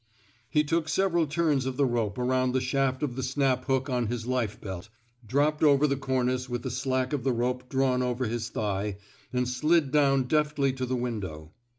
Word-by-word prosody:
He 150 - +3
took 155 +1 0
several 175 -4 +2
turns 150 -4 +1
of 130 -1 -3
the 140 - +3
rope 115 -4 -1
around 130 0 +1
the 130 - +2
shaft 130 +1 0
of 130 -5 -2
the 130 - -3
snap 130 -1 0
hook 135 -1 +1
on 125 -3 0
his 115 0 -3
life 125 -4 -1
bdt, 95 0 -7 0.4
dropped 145 +5 +1
over 145 -1 +5
the 140 -2 +1
cornice 130 -1 -1
with 120 -1 -3
the - - -3
slack 130 0 -1
of 140 -5 -1
the 135 - +2
rope 125 +1 -2
drawn 130 -2 +1
over 125 0 -1
his 115 +1 -3
thigh, 100 -2 -2 0.3
and 125 0 0
slid 150 +3 +2
down 140 -2 +4
deftly 150 -1 +1
to 130 -1 -3
the 130 - -1
window. 95 -11 -4
130 Hz, 200 wpm, -28 LUFS, 120-140 Hz, 0.4 s, over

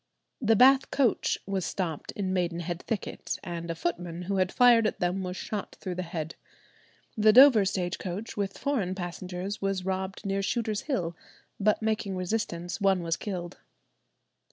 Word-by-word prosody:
The 225 -2 +4
Bath 265 +4 +6
coach 265 -5 +2
was 195 -1 -2
stopped 165 -6 -3
in 190 -2 -2
Maidenhead 175 -1 -2
thicket, 225 -4 -3
and 170 -1 -5
a 165 - -2
footman 175 - -3
who 195 +2 -1
had 185 -1 +1
fired 240 -3 +6
at - - -3
them 180 +2 0
was 180 0 -4
shot 210 0 -5
through 185 - -4
the 180 - -3
head. 165 -2 -4 0.8
The 215 -1 +5
Dover 245 -3 +8
stage 185 -2 -1
coach, 195 +5 -5
with 200 -1 -2
foreign 225 -10 -1
passengers, 180 +2 -5
was 195 -2 -1
robbed 190 +1 -3
near 195 0 0
Shooter's 215 0 -1
Hill, 175 - -1 0.4
but 210 +2 +2
making 215 -3 -1
resistance, 180 -1 -3
one 195 -3 +3
was 165 -1 0
killed. 180 -3 -5
190 Hz, 160 wpm, -28 LUFS, 175-215 Hz, 0.8 s, Dover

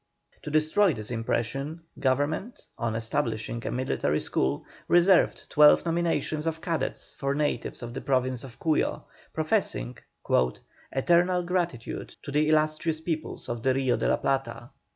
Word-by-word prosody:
To - - -6
destroy 155 +4 +3
this 110 +1 -6
impression, 135 +7 -2 0.2
government, 145 - -1
on 115 -2 -2
establishing 115 -1 -2
a - - -1
military 125 - 0
school, 70 +2 -1 0.2
reserved 175 +1 +4
twelve 150 +2 +6
nominations 165 -2 0
of 160 0 -1
cadets 165 -1 -3
for 140 0 -2
natives 145 -5 -1
of 120 0 -6
the 135 - -5
Province 130 -1 0
of 125 -3 -11
Cuyo, 160 -2 0 0.3
professing - - -1 0.9
"eternal 175 +5 +3
gratitude 175 -9 -3
to 140 - -6
the 150 +2 +2
illustrious 155 +1 +1
peoples 160 -1 -4
of 120 -1 -4
the 130 +2 +2
Rio 130 -2 +2
de - - -1
la - - +3
Plata." 130 -3 -2
145 Hz, 140 wpm, -27 LUFS, 120-160 Hz, 0.9 s, twelve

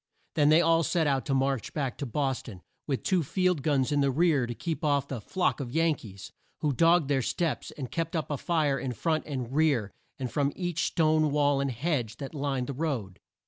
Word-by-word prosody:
Then 145 -1 +4
they 155 +2 +6
all 165 0 +4
set 165 0 +1
out 135 -2 0
to 135 - +1
march 135 -2 -1
back 135 -5 -1
to 140 - -3
Bos 135 +1 -1
ton, 95 -8 -11 0.2
with 135 -3 -2
two 185 -3 +2
field 180 +1 +1
guns 140 -2 +1
in 145 -1 +2
the 140 - +3
rear 145 -3 +2
to 120 - -5
keep 165 - -4
off 140 -2 +1
the 130 -6 -5
"flock 180 - 0
of 135 -4 -4
Yan 165 +2 +3
kees," 100 -8 -10 0.3
who 150 -2 +1
dogged 165 +2 +4
their 135 -2 +2
steps, 165 +5 -2
and 130 -4 -7
kept 165 +1 -2
up 155 -2 -2
a 145 - -1
fire 150 -5 +1
in 125 0 -3
front 155 +5 -1
and 130 -4 -4
rear, 140 -10 +2 0.3
and 130 -3 -4
from 140 -1 0
each 175 -3 -1
stone 155 -1 +2
wall 145 -1 +2
and 140 - 0
hedge 125 -3 -2
that 135 +1 -7
lined 140 -3 -1
the 140 - -4
road. 130 - -3
145 Hz, 225 wpm, -28 LUFS, 130-160 Hz, 0.3 s, they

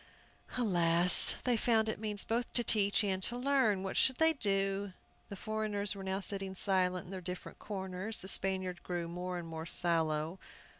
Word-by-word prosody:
Alas, 175 -6 +5
they 250 -1 +2
found 220 -1 +2
it 220 - -3
means 210 -2 0
both 235 +2 -2
to 240 - +2
teach 205 -1 +2
and 190 -2 -1
to 235 +5 0
learn! 250 -7 +2
What 190 - -4
should 260 - +4
they 320 +4 +3
do? 195 -5 -1 0.4
The 200 - -6
foreigners 210 -1 -2
were 195 - -8
now 190 +1 -2
sitting 195 -1 -1
silent 185 -2 +1
in 180 - -11
their 190 -1 -6
different 180 +1 -7
corners. 190 +1 -4
The 190 - -5
Spaniard 185 -2 -1
grew 175 -2 -4
more 180 +1 -5
and 170 -1 -6
more 160 0 -6
sallow. 165 0 0
195 Hz, 180 wpm, -33 LUFS, 180-215 Hz, 0.4 s, Alas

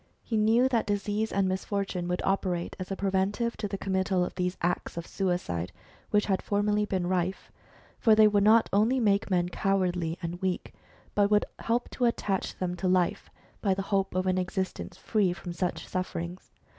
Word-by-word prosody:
He 230 - -3
knew 225 +4 +4
that 235 -4 0
disease 205 +1 -1
and 195 -1 +1
misfortune 190 -1 -2
would 180 0 -1
operate 185 -3 -1
as 185 - -5
a 195 - -2
preventive 200 +4 0
to 210 - -2
the 195 0 -4
committal 190 -1 0
of - - -6
those 180 0 -2
acts 175 0 -2
of 170 - -4
suicide 135 - -2 0.4
which 210 0 +3
had 195 -2 +1
formerly 210 +1 +1
been 190 -3 -1
rife; 185 +1 -1 0.5
for 220 -3 +5
they 215 0 +7
would 205 -1 +3
not 220 +2 +6
only 225 +6 +3
make 205 -2 +2
men 175 -2 +1
cowardly 180 -3 0
and 175 +1 -5
weak, 185 -1 -2 0.4
but 205 -1 +3
would 210 0 +3
help 235 +1 0
to 250 - 0
attach 200 -5 -1
them 180 -1 -2
to 185 - -1
life 180 -1 +1 0.3
by 195 -3 +2
the 195 - -2
hope 195 -1 +1
of 185 0 +1
an 185 0 +2
existence 190 +1 -3
free 200 -5 +1
from 175 -1 -7
such 180 0 -2
sufferins^s. 180 -1 -4
190 Hz, 185 wpm, -28 LUFS, 180-210 Hz, 0.5 s, they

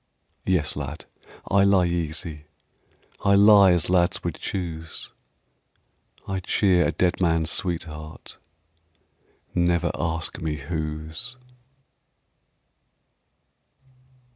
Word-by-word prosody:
Yes, 90 -6 +1
lad, 75 +2 -6 0.5
I 100 0 +5
lie 100 -2 +4
easy, 80 -2 -3 0.8
I 100 0 +5
lie 100 -1 +7
as 85 -2 +2
lads 90 -1 +2
would - - -2
choose; 80 -4 -5 1.2
I 95 0 -2
cheer 95 -1 +2
a - - 0
dead 90 +3 0
man's 80 -2 +2
sweetheart, 80 -4 -5 1.1
Never 85 -1 +2
ask 80 -1 -3
me 80 -2 -2
whose. 80 - -5
85 Hz, 90 wpm, -24 LUFS, 80-95 Hz, 1.2 s, lie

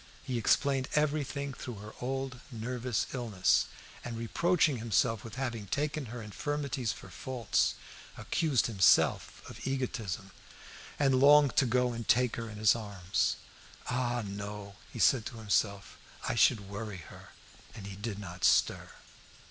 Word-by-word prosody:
He 125 -2 -2
explained 135 +3 +2
everything 145 -2 0
through 125 -2 -7
her 105 +2 -10
old 135 0 -3
nervous 120 0 -2
illness, 110 -8 +2 0.4
and 120 -1 -5
reproaching 155 +5 +2
himself 115 0 +1
with 115 - -9
having 120 -6 -3
taken 145 +4 -2
her 115 0 -7
infirmities 140 +2 -2
for 95 - -10
faults, 115 +3 0 0.4
accused 150 -7 +1
himself 100 -5 +3
of - - -10
egotism, 120 -8 -3 0.7
and 135 -3 +3
longed 145 0 +6
to 135 - +5
go 125 +1 +2
and 115 -2 -6
take 125 0 +3
her 115 -1 -4
in 105 - -9
his 105 0 +5
arms. 100 -5 -1 0.6
"Ah, 120 -1 0
no!" 100 0 -6 0.2
he - - -8
said 130 -5 +4
to 120 - -8
himself; 100 -2 -1 0.3
"I - - 0
should 110 -3 +3
worry 100 -3 -6
her." - - -13 0.5
And 105 -4 -8
he 100 -1 -7
did 105 0 -5
not 90 -3 -8
stir. - - +3
120 Hz, 145 wpm, -31 LUFS, 105-130 Hz, 0.7 s, longed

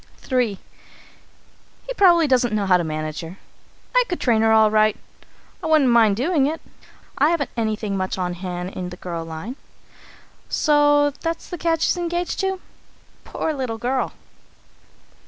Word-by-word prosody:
III. 245 -6 +1 1.3
"He - - -4
probably 350 -7 +5
doesn't 250 -5 +2
know 205 -2 0
how 190 -1 +4
to 175 - +2
manage 155 0 -4
her. 165 +3 -9 0.6
I - - +6
could 355 - -2
train 230 -4 +2
her 225 0 +3
all 220 -1 +5
right. 215 -1 +3 0.6
I 330 - -3
wouldn't 305 -5 +4
mind 225 -4 +5
doing 280 - +1
it; 315 +2 -3 0.6
I 290 +3 +5
haven't 330 -5 -1
anything 215 -3 -2
much 185 0 -2
on 180 -1 -2
hand 180 0 -5
in 180 -2 -5
the 180 - -10
girl 170 -2 -5
line. 165 - -7 0.9
So 290 -1 +3
that's 330 0 -4
the 355 - -4
cad 330 -1 +1
she's - - +2
engaged 345 0 -2
to? 385 -1 -1 0.7
Poor 315 - -3
little 255 -5 -3
girl! 255 +3 -1
240 Hz, 155 wpm, -22 LUFS, 190-315 Hz, 1.3 s, I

